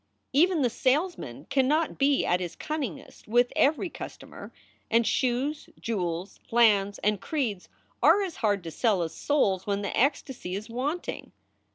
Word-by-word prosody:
Even 330 +2 +4
the 245 - +3
salesman 260 - -1
cannot 295 +4 +1
be 275 0 +3
at 180 - +2
his 175 -2 -5
cunningest 285 - -5
with 240 +3 +3
every 305 +6 +3
customer; - - -9 0.4
and 230 +1 +3
shoes, 260 +6 0
jewels, 180 -4 -3
lands, 205 -4 +4
and 210 -1 +1
creeds 235 - -2 0.3
are 405 - +5
as 365 -4 -5
hard 205 -4 +1
to 165 - -6
sell 200 0 +1
as 160 - -5
souls 200 -11 +1
when 200 0 -1
the 200 - -3
ecstasy 260 -7 0
is 215 +3 -6
wanting. 285 +9 -4
240 Hz, 150 wpm, -27 LUFS, 200-285 Hz, 0.4 s, are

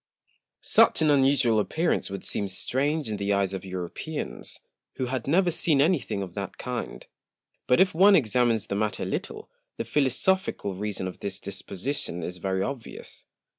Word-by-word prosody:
Such - - +4
an 155 - +4
unusual 135 -5 +4
Appearance 160 +10 +1
would 100 -1 -6
seem 100 - 0
strange 140 +10 0
in 105 -1 -2
the 100 0 -1
Eyes 100 -1 +1
of 95 - -5
Europeans, 95 - -5 0.4
who 130 - -2
had 125 -1 -3
never 175 +4 +3
seen 155 -3 +2
any 165 +4 +4
thing 100 -5 -4
of 90 -3 -8
that 100 0 -5
kind; 125 -1 -5 0.6
but 125 - +4
if 190 0 +4
one 195 +4 +6
examines 120 - +2
the - - -4
Matter 105 0 -1
a - - -2
little, - - -4 0.3
the - - -3
philosophical 140 - +1
Reason 100 -1 -3
of 95 - -8
this 100 -1 -4
Disposition 95 - -5
is 90 +2 -5
very 95 +1 -1
obvious. 125 +1 -7
115 Hz, 170 wpm, -26 LUFS, 100-145 Hz, 0.6 s, one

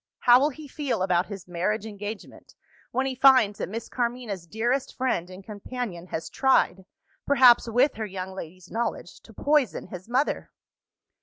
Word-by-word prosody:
How 245 0 +7
will 285 +3 +3
he 305 +1 -10
feel 275 - -2
about 180 -1 +1
his 195 -3 -8
marriage 185 +5 -1
engagement, 205 0 -8 0.3
when 260 +2 -1
he 265 - -1
finds 255 -6 +5
that - - -3
Miss 230 +3 -5
Carmina's 235 -7 -3
dearest 240 +7 -1
friend 250 -9 -1
and 185 +1 -11
companion 205 -3 -6
has 160 -2 -4
tried 190 - +2 0.4
perhaps, 250 -4 +6
with 250 +5 +3
her 220 - -3
young 190 -1 -6
lady's 180 0 -10
knowledge 230 0 -3
to - - -17
poison 290 -5 +1
his 185 +3 -9
mother? 260 +4 0
220 Hz, 160 wpm, -26 LUFS, 185-255 Hz, 0.4 s, How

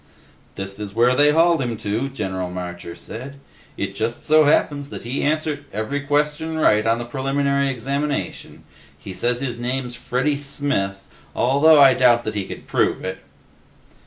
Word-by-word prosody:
"This 95 +1 -5
is 105 -1 -6
where 120 +2 +4
they 145 +2 +5
hauled 165 0 +4
him 120 -3 -2
to," 110 +7 -2
General 95 -8 -4
Marcher 90 -1 -6
said. 130 +5 -8 0.4
"It - - -3
just 110 +4 -3
so 155 0 +5
happens 145 -1 +1
that - - -8
he 125 +4 -3
answered 150 -1 -1
every 110 +8 -2
question 150 +2 -1
right 105 -8 +3
on 115 +1 +3
the 120 - -5
preliminary 140 +2 0
examination. 135 -4 -3 0.3
He 95 +6 -9
says 120 +7 -1
his 120 -3 -3
name's 125 0 -2
Freddy 130 +4 -1
Smith, 140 -9 -2 0.3
although 145 +5 +5
I 135 -2 +8
doubt 120 -2 +4
that 110 - -3
he 100 -2 -3
could - - -9
prove - - 0
it." - - -4
130 Hz, 160 wpm, -21 LUFS, 110-145 Hz, 0.4 s, I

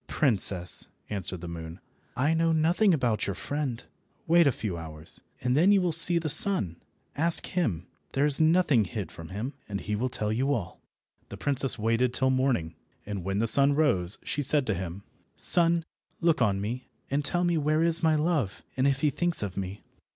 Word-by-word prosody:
"Princess," 100 - +1 0.2
answered 95 -3 -3
the 85 - -7
moon, 85 +1 -8 0.4
"I 145 +5 +1
know 165 0 +1
nothing 170 +6 +2
about 125 - 0
your 100 - -3
friend. 135 - -4 0.4
Wait 170 -1 +4
a - - +4
few 105 -6 -5
hours, 80 -1 -7 0.2
and 125 0 0
then 175 +7 +4
you 200 - +4
will 180 -2 0
see 165 +2 +4
the 165 -1 -2
sun. 150 - +5 0.4
Ask 165 +3 +5
him. 110 - -2 0.3
There 140 +2 +1
is 150 +1 +1
nothing 155 - +3
hid 95 -2 -6
from 80 -2 -11
him, 110 +9 -5 0.2
and 100 -1 -4
he 105 +3 -4
will 125 +5 -2
tell 105 -3 -2
you 135 +5 0
all." 90 -6 -7 0.5
The - - -9
princess 135 -3 0
waited 115 +3 0
till 130 -1 +1
morning, 130 -11 -1 0.3
and 100 -3 -6
when 95 +2 -3
the 110 - +1
sun 140 +4 +5
rose 100 - +1
she 145 - -3
said 145 0 +1
to 110 - -1
him— 95 +1 -6 0.3
"Sun, 170 -1 +4 0.4
look 165 -5 +1
on 100 -4 +1
me, 115 +6 -5 0.2
and 145 +2 0
tell 175 +5 0
me 175 -2 +1
where 155 +2 +1
is 170 0 +3
my 160 -2 +2
love, 150 - -1
and 130 +1 +1
if 135 -1 0
he 150 - +2
thinks 175 -3 0
of 100 -2 -5
me." 95 +1 -6
130 Hz, 195 wpm, -27 LUFS, 100-155 Hz, 0.5 s, sun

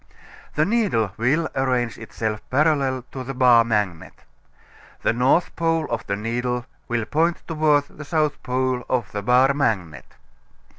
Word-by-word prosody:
The 150 - +3
needle 190 - +1
will 140 +8 +1
arrange 125 -3 0
itself 110 -1 -4
parallel 135 -3 +1
to 130 - -6
the 135 +1 -6
bar 125 -2 +6
magnet. 105 -7 -2 0.8
The - - +2
north 130 +8 +2
pole 165 -1 +1
of - - -3
the 100 - 0
needle 120 +3 -2 0.2
will 120 -2 -1
point 165 +7 0
toward 155 -3 +2
the 150 - -11
south 155 -1 0
pole 130 -1 -1
of 120 -5 -1
the 105 - -3
bar 125 +5 +4
magnet. 105 - -2
125 Hz, 145 wpm, -22 LUFS, 115-150 Hz, 0.8 s, bar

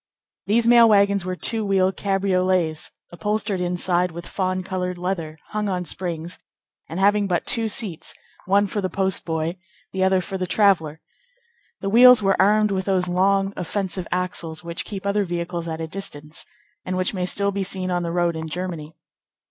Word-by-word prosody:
These 230 +3 +3
mail 235 -1 +7
wagons 200 -2 +3
were 185 0 -2
two 225 +4 0
wheeled 195 -1 +2
cabriolets, 185 -4 0 0.2
upholstered 210 +1 -2
inside 180 0 +1
with 170 +1 -8
fawn 185 -1 -2
colored 180 -1 -3
leather, 175 -4 -3
hung 210 -1 -2
on 180 -1 -2
springs, 170 0 -4 0.5
and 165 - -4
having 205 +1 +3
but 180 -2 0
two 225 -2 +1
seats, 205 -6 -3 0.3
one 200 +2 +4
for 205 +1 -3
the 185 - -1
postboy, 170 -3 -1 0.4
the 190 0 0
other 190 0 +3
for 190 +1 -5
the 185 - -2
traveller. 170 -6 +2 0.8
The 195 - -2
wheels 245 +1 +8
were 195 0 +3
armed 210 +1 +4
with 190 -1 -1
those 185 -2 +1
long, 195 +2 +2
offensive 185 0 -3
axles 175 -3 -2
which 170 0 -5
keep 200 -2 -7
other 200 +1 +1
vehicles 170 -1 -4
at 160 -1 -4
a 165 - -3
distance, 155 -4 -6 0.4
and 185 0 -3
which 185 +2 0
may 180 -2 -2
still 200 +1 +1
be 200 0 -2
seen 185 -1 -2
on 175 0 0
the 170 - -3
road 175 -1 +1
in 160 0 -5
Germany. 165 -2 -5
185 Hz, 175 wpm, -23 LUFS, 175-200 Hz, 0.8 s, wheels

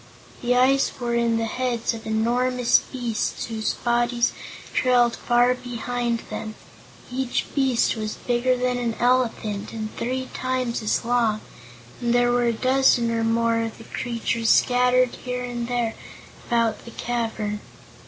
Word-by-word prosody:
The 245 0 +2
eyes 270 +2 +4
were 240 -1 -2
in 235 -1 +2
the 225 - 0
heads 240 0 -1
of 225 -1 -8
enormous 245 +3 +2
beasts 240 -4 -3
whose 220 -2 -2
bodies 240 0 +1 0.4
trailed 245 -2 +3
far 245 +1 +3
behind 245 -1 -3
them. 215 -1 -5 0.6
Each 255 0 -1
beast 265 -4 +2
was 215 -1 -4
bigger 250 +1 +1
than 250 0 0
an 235 -2 -1
elephant, 235 -5 0
and 215 -1 -5
three 260 +2 -2
times 255 -2 -1
as 215 +1 0
long, 230 -3 +2 0.6
and 240 0 +1
there 245 0 +4
were 245 0 +2
a 235 - +3
dozen 255 -1 +3
or 230 0 0
more 230 0 +2
of 225 -1 -4
the 225 - -11
creatures 230 -1 -2
scattered 250 0 +4
here 250 0 -3
and 240 -1 -4
there 240 -2 -1 0.5
about 230 -3 +1
the - - -10
cavern. 225 -3 -2
240 Hz, 145 wpm, -24 LUFS, 230-250 Hz, 0.6 s, eyes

